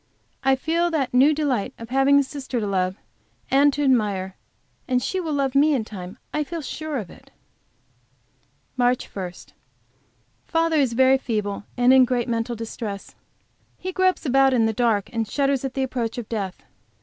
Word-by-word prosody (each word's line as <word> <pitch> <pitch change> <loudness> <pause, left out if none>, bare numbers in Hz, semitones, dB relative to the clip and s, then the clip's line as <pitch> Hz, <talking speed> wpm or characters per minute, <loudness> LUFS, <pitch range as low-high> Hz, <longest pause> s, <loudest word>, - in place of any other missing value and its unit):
I 270 0 +4
feel 335 +6 0
the 305 -6 0
new 265 +4 +6
delight 285 -8 -1
of 230 0 -9
having 270 +2 +4
a 280 - +4
sister 265 -2 -5
to 215 - -2
love 185 -2 0 0.6
and 280 +2 +5
to 290 - -1
admire. 205 -8 +1 0.5
And 255 -1 +2
she 375 +9 -2
will 330 -4 -3
love 275 -2 0
me 290 +2 +4
in 230 -5 -1
time; 190 0 -8 0.2
I 300 - 0
feel 330 +1 -6
sure 310 +2 -4
of 205 -8 -6
it. - - -17 1.5
MARCH 245 0 +2
1. 185 -3 -4 1.1
Father 330 -1 +1
is 265 -5 +2
very 260 +2 +4
feeble 210 -5 -3
and 245 +1 +5
in 260 -1 +7
great 245 0 -1
mental 230 0 -1
distress. 220 -3 -6 0.6
He 370 - -5
gropes 370 -2 +1
about 270 0 +4
in 230 -2 +3
the 225 - +1
dark, 220 -3 +1
and 225 -2 -1
shudders 275 +2 0
at 265 -1 -4
the 270 - 0
approach 245 -3 -3
of 235 -3 -5
death. 200 -5 -4
255 Hz, 175 wpm, -23 LUFS, 225-280 Hz, 1.5 s, in